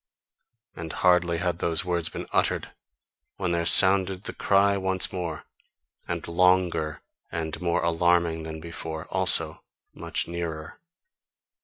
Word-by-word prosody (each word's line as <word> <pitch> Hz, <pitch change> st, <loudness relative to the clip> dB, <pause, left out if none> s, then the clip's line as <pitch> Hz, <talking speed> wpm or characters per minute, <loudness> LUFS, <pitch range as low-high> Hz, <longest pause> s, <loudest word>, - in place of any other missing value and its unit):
And 80 Hz, -1 st, -7 dB
hardly 90 Hz, -1 st, +2 dB
had 90 Hz, -1 st, -2 dB
those 85 Hz, 0 st, 0 dB
words 85 Hz, -2 st, -1 dB
been -, -, -7 dB
uttered -, -, 0 dB, 0.6 s
when 90 Hz, -3 st, -2 dB
there 85 Hz, -1 st, 0 dB
sounded 95 Hz, +1 st, +5 dB
the -, -, -6 dB
cry 100 Hz, 0 st, +2 dB
once 95 Hz, -1 st, +1 dB
more, 85 Hz, -4 st, -4 dB, 0.6 s
and -, -, -4 dB
longer 90 Hz, -3 st, +1 dB, 0.3 s
and 80 Hz, -1 st, -4 dB
more 85 Hz, -1 st, 0 dB
alarming 85 Hz, -1 st, +1 dB
than 80 Hz, 0 st, -7 dB
before 80 Hz, -1 st, -6 dB
also -, -, +2 dB, 0.3 s
much -, -, -3 dB
nearer. 85 Hz, -2 st, -6 dB
85 Hz, 125 wpm, -25 LUFS, 80-90 Hz, 0.6 s, sounded